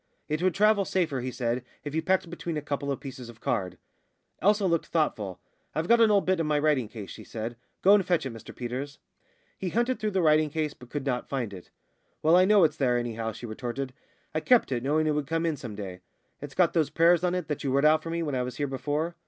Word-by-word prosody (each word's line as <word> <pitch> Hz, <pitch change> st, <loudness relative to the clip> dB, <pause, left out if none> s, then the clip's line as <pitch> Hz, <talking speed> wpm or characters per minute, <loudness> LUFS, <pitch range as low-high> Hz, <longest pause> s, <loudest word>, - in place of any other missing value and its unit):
"It 155 Hz, +1 st, -1 dB
would 185 Hz, -2 st, +2 dB
travel 210 Hz, 0 st, +4 dB
safer," 170 Hz, -8 st, 0 dB
he 130 Hz, -, -3 dB
said, 120 Hz, -1 st, -2 dB, 0.2 s
"if 145 Hz, -, -5 dB
you 160 Hz, -, +1 dB
packed 190 Hz, +2 st, +2 dB
it -, -, -13 dB
between 170 Hz, -2 st, -4 dB
a -, -, -2 dB
couple 140 Hz, -1 st, -2 dB
of 135 Hz, -, -2 dB
pieces 130 Hz, -3 st, -8 dB
of 115 Hz, -1 st, -13 dB
card." 95 Hz, -9 st, -2 dB, 0.6 s
Elsa 205 Hz, 0 st, +3 dB
looked 170 Hz, -3 st, +1 dB
thoughtful. 105 Hz, -, -1 dB, 0.4 s
"I've 160 Hz, +2 st, -1 dB
got 235 Hz, +2 st, +5 dB
an 225 Hz, -, +6 dB
old 205 Hz, -2 st, +3 dB
bit 185 Hz, -1 st, +2 dB
in 165 Hz, -, 0 dB
my 150 Hz, -1 st, +2 dB
writing 145 Hz, -5 st, +2 dB
case," 105 Hz, -3 st, -8 dB
she -, -, -9 dB
said. 115 Hz, +1 st, -5 dB, 0.3 s
"Go 195 Hz, -, +7 dB
and 205 Hz, -2 st, +5 dB
fetch 175 Hz, -5 st, +1 dB
it, 130 Hz, -, -4 dB
Mr 115 Hz, -, -11 dB
Peters." 130 Hz, +4 st, -5 dB, 0.6 s
He 190 Hz, -, -2 dB
hunted 240 Hz, +4 st, 0 dB
through 215 Hz, -1 st, 0 dB
the 190 Hz, -3 st, 0 dB
writing 155 Hz, -1 st, +4 dB
case, 155 Hz, 0 st, -2 dB
but 125 Hz, -, -15 dB
could 145 Hz, 0 st, -4 dB
not 125 Hz, -3 st, -2 dB
find 120 Hz, -7 st, -2 dB
it. 90 Hz, -2 st, -11 dB, 0.5 s
"Well, 160 Hz, +2 st, +6 dB
I 185 Hz, +1 st, +6 dB
know 205 Hz, -1 st, +6 dB
it's 155 Hz, -1 st, +2 dB
there, 125 Hz, -3 st, +2 dB
anyhow," 115 Hz, -2 st, -2 dB
she 120 Hz, -, -9 dB
retorted. 125 Hz, +3 st, -4 dB, 0.4 s
"I 155 Hz, -, +1 dB
kept 240 Hz, -, +3 dB
it, 120 Hz, -2 st, 0 dB
knowing 150 Hz, +4 st, +1 dB
it 155 Hz, -, +2 dB
would 150 Hz, -2 st, -2 dB
come 165 Hz, +2 st, 0 dB
in 165 Hz, -2 st, +1 dB
some 120 Hz, -7 st, -7 dB
day. 95 Hz, -3 st, -6 dB, 0.4 s
It's 145 Hz, 0 st, -8 dB
got 180 Hz, -2 st, +3 dB
those 160 Hz, -4 st, +2 dB
prayers 170 Hz, +1 st, +4 dB
on 180 Hz, 0 st, +1 dB
it 180 Hz, -4 st, -3 dB
that 150 Hz, -, -3 dB
you 135 Hz, -, 0 dB
wrote 140 Hz, +2 st, +3 dB
out 155 Hz, +1 st, +5 dB
for 165 Hz, -, -6 dB
me 170 Hz, 0 st, -1 dB
when 150 Hz, -3 st, -2 dB
I 130 Hz, -, 0 dB
was 125 Hz, -1 st, -4 dB
here 145 Hz, -, -1 dB
before." 145 Hz, +5 st, -2 dB
150 Hz, 260 wpm, -28 LUFS, 125-170 Hz, 0.6 s, Go